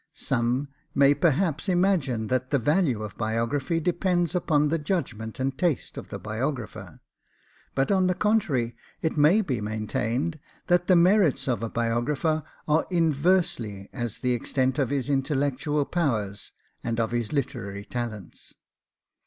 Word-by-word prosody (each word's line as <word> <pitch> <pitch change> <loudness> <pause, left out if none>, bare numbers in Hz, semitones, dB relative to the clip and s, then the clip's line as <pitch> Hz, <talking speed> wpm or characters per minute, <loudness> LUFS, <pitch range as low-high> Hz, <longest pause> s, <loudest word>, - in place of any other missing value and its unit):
Some 125 +2 0 0.3
may 140 0 +6
perhaps 160 +4 +1
imagine 175 - +2
that 130 +2 -1
the 140 - +3
value 135 - +1
of 105 - -8
biography 115 +8 0
depends 175 0 +1
upon 150 -4 +2
the 165 +2 0
judgment 125 - -3
and 135 +1 -1
taste 170 -4 -1
of - - -8
the - - -5
biographer; 120 +3 -4 0.7
but 135 +5 +1
on 190 -2 +3
the 180 - +1
contrary 160 - +1 0.3
it 160 - 0
may 155 +8 +5
be 130 - -2
maintained, 110 +8 -2 0.3
that 175 0 +2
the 185 - +6
merits 180 -4 +4
of 125 -3 0
a 115 - -2
biographer 120 +8 0 0.3
are 155 +1 +2
inversely 155 - +1
as 120 -4 -3
the 125 -1 0
extent 130 +2 0
of 135 - +1
his 135 -3 -1
intellectual 145 +1 0
powers 110 - -1 0.3
and 115 0 -2
of 115 -1 0
his 120 -3 -1
literary 115 -8 -3
talents. 110 -7 -6
140 Hz, 145 wpm, -26 LUFS, 120-165 Hz, 0.7 s, may